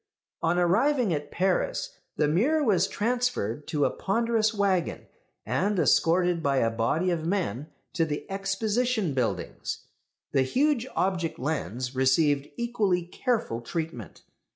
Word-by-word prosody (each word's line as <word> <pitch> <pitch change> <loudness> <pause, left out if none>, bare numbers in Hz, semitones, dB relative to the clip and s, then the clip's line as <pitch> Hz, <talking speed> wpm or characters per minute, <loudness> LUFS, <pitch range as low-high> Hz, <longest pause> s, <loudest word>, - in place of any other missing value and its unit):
On 170 +1 +1
arriving 220 - +3
at 145 -1 -3
Paris, 185 +1 -1 0.2
the 150 - +2
mirror 260 - +2
was 195 -7 +3
transferred 220 - -1
to 145 -2 +1
a - - +1
ponderous 225 +1 +1
waggon, 200 -5 0 0.4
and 205 +2 0
escorted 175 0 +3
by 140 -3 +1
a 115 -3 +2
body 145 +11 0
of 165 -2 -1
men 170 - -1 0.3
to 170 - +2
the 150 -2 -3
Exposition 205 - 0
buildings. 105 -9 -3 0.5
The 135 - +3
huge 260 - +1
object 180 -3 0
lens 125 - -3
received 140 +2 +2
equally 215 -7 0
careful 180 - -2
treatment. 125 - -5
175 Hz, 130 wpm, -27 LUFS, 145-215 Hz, 0.5 s, arriving